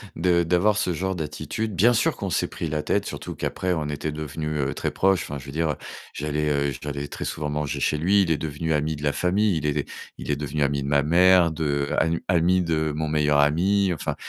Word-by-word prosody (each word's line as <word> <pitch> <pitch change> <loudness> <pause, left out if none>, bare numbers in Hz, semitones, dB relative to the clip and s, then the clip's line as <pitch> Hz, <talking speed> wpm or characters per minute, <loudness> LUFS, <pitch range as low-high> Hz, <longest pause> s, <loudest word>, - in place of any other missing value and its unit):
de 85 0 +2
d'avoir 90 +5 +2
ce 90 - 0
genre 95 +3 -2
d'attitude. 90 +7 -4
Bien 115 +8 +5
sûr, 115 - +2
qu'on - - -3
s'est - - 0
pris 85 - -4
la 75 0 -2
tête, - - 0
surtout - - -6
qu'après, 90 -1 -2
on 80 -3 -2
était 75 +1 -3
devenu, 75 0 -4
heu, 70 -2 -1
très - - -2
proches, 95 -1 +2
enfin, 70 - -6
je 65 - -12
veux 70 - -8
dire, 80 -1 0 0.4
j'allais, 75 +1 -1
heu, 70 -1 0
j'allais 70 -1 -4
très - - -6
souvent 75 -1 -3
manger 75 -1 -2
chez 75 - +1
lui. 95 +6 +3
Il 85 - -1
est 80 - +2
devenu 80 +2 -2
ami 75 +1 0
de 75 - -9
la 70 -1 +1
famille, 95 +2 +1
il 75 - -3
est 75 -1 -1 0.3
il - - -8
est 75 - +2
devenu 75 +1 -3
ami 70 0 0
de - - -4
ma 70 0 +3
mère, 90 +2 +5
de 70 -3 -1
anu 80 +1 +1
ami 90 +1 +3
de 80 -2 0
mon 80 0 -2
meilleur 75 -1 +2
ami, 90 +6 +3
enfin, 80 - -3
75 Hz, 235 wpm, -24 LUFS, 75-90 Hz, 0.4 s, Bien